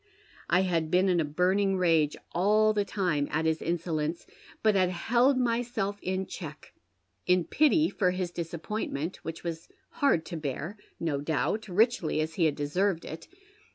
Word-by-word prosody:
I 180 +2 +4
had 170 -4 0
been 185 +3 +3
in 175 -2 +3
a - - +2
burning 185 +6 +1
rage 165 -5 +2
all 215 +4 +3
the 205 -1 +1
time 175 -9 -1
at 160 +2 -1
his 160 0 +1
insolence, 165 -1 -2 0.4
but 215 -1 +5
had 185 -2 +3
held 240 +9 +2
myself 230 -4 -1
in 190 +1 -2
check, - - -9 0.5
in 180 -1 +4
pity 310 - +3
for 185 - +1
his 180 -1 -2
disappointment, 170 -1 -4
which 165 0 -7
was 165 -1 -5 0.3
hard 175 - +3
to 170 - -5
bear, 155 +5 -4 0.2
no 155 -4 -1
doubt, 160 - -1
riclJy 200 -4 +2
as 155 +1 -1
he 165 0 +2
had 150 -2 +2
deserved 170 +5 0
it. 160 +1 -8
180 Hz, 160 wpm, -28 LUFS, 160-205 Hz, 0.5 s, but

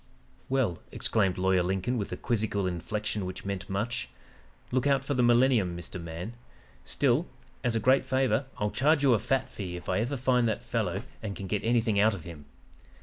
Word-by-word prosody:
"'Well,' 130 -11 +1
exclaimed 100 -5 +1
Lawyer 95 0 +3
Lincoln 95 +7 -1
with 105 -4 -3
a - - -3
quizzical 105 -4 -1
inflection 105 +4 -2
which 95 +1 -6
meant 100 0 -4
much. 100 - -2 0.6
'Look 130 +2 +1
out 135 -1 +2
for 145 - 0
the 125 - +2
millennium, 120 -7 +4
Mr. 85 +1 -7
Man 85 +6 -6 0.5
still, 135 - +1 0.4
as 120 -3 +1
a - - +2
great 130 +5 +4
favor, 130 0 +1
I'll 105 0 -1
charge 145 +2 +3
you 135 -3 +6
a 110 - +3
fat 135 +3 0
fee 90 -4 -6
if 90 - -8
I - - +1
ever 125 +6 -1
find 125 -1 +2
that 115 +2 -2
fellow 105 -4 -1 0.2
and 105 -3 -4
can 100 - -6
get 100 +2 -2
anything 115 -3 +2
out 105 +1 +4
of 90 - -9
him. 80 -4 -10
110 Hz, 195 wpm, -29 LUFS, 95-125 Hz, 0.6 s, you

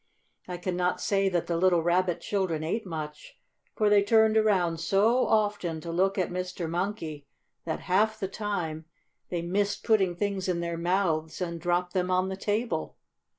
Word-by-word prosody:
I 180 -1 -4
can 180 +1 -3
not 180 0 0
say 195 -1 +1
that 175 -2 0
the 170 - -1
little 175 -1 +3
Rabbit 175 +1 +1
children 185 -6 -1
ate 195 +6 -2
much, 155 -3 -7 0.4
for 215 - +2
they 205 -1 +5
turned 220 +1 +4
around 185 -7 +2
so 205 +9 +3
often 205 -6 +1
to 170 - -5
look 190 +4 +1
at 185 -2 0
Mr. 180 -1 -4
Monkey, 165 -4 -3 0.4
that, 160 - -3
half 215 +4 +1
the 195 - -2
time, 180 -6 -3 0.4
they 170 -2 -2
missed 200 +4 -1
putting 195 -5 +2
things 195 0 -2
in 175 -1 0
their 170 0 -2
mouths 165 -3 0
and 170 -2 -4
dropped 175 +1 0
them 185 -1 0
on 185 +1 +1
the 190 - -3
table. 205 -3 -2
180 Hz, 175 wpm, -28 LUFS, 170-200 Hz, 0.4 s, they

